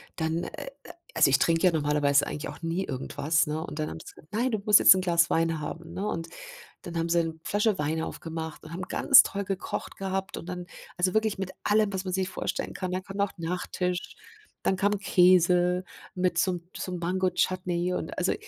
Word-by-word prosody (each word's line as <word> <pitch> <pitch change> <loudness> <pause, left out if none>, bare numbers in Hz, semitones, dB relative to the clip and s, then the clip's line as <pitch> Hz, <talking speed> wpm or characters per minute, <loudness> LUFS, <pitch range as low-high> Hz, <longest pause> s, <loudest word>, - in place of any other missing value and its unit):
dann 160 +1 -1
äh, - - -8 0.5
also 155 -3 +5
ich 135 - +4
trinke 165 +1 +2
ja 180 - +6
normalerweise 145 -2 +2
eigentlich 150 - -5
auch - - -10
nie 165 +3 -1
irgendwas, 145 +4 0
ne? 155 +2 -3
Und 155 - -8
dann 155 - -1
haben - - -7
sie - - -11
gesagt: 170 +7 -19
„Nein, 240 +3 +1
du 215 - 0
musst 210 -1 +7
jetzt - - +8
'n 185 - 0
Glas 170 -2 +3
Wein 165 -1 +1
haben”, 165 +3 -7
ne? 195 +3 -3
Und 165 -3 -3 0.6
dann 170 -1 -6
haben 165 0 -1
sie 170 0 +3
'ne 160 0 -5
Flasche 210 -1 +1
Wein 155 +2 -1
aufgemacht 160 -1 -6
und 160 - -11
haben 180 +2 -5
ganz - - +6
toll 200 0 -3
gekocht 195 -1 -4
gehabt 190 0 -3
und 170 - -8
dann 180 -1 -5 0.3
also 180 +1 +1
wirklich 220 -2 +1
mit 190 -1 -4
allem, 210 -1 +2
was 190 0 -2
man 185 - -3
sich 190 0 0
vorstellen - - -3
kann. 185 -1 -4
Dann 185 0 -2
kam 195 +1 -9
noch 200 -1 +1
Nachtisch, 180 +1 -3 0.5
dann 190 - +2
kam 205 +1 +1
Käse 180 -1 +4 0.3
mit 180 -2 0
so 185 - +3
'm 175 - -5 0.2
so 185 - -4
'nem 175 - -4
Mango-Chutney 180 0 0
und - - -4
also - - +1
180 Hz, 215 wpm, -27 LUFS, 165-190 Hz, 0.6 s, jetzt